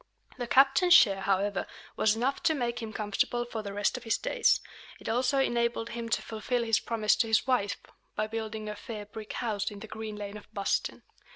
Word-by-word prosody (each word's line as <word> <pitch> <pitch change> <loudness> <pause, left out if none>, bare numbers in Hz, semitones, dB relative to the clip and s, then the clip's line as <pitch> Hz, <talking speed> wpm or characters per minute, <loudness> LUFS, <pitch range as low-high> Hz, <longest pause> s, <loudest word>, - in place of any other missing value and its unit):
The 245 - -3
captain's 275 +8 +6
share, 195 - +6
however, 195 0 0 0.3
was 215 0 +3
enough 255 +5 -1
to 315 - +2
make 240 -3 -2
him 225 -1 -5
comfortable 215 +3 -1
for 230 -2 -5
the 200 -1 -6
rest 205 +4 0
of 250 - -9
his 225 - +1
days. - - +2 0.4
It - - -10
also 250 +4 +1
enabled 235 -3 +1
him 235 -1 -5
to - - 0
fulfil 230 +3 -2
his 225 -2 +3
promise 220 -2 +1
to 230 - +2
his 220 0 +3
wife, 250 -6 +1 0.4
by 215 - 0
building 220 -1 -5
a 210 - -4
"fair 210 -1 -7
brick 210 +1 -8
house" 215 -5 -2
in 205 - -10
the 220 - -8
Green 220 -1 -6
Lane 205 0 -6
of 210 - -15
Boston. 200 -1 -1
225 Hz, 205 wpm, -29 LUFS, 210-240 Hz, 0.4 s, captain's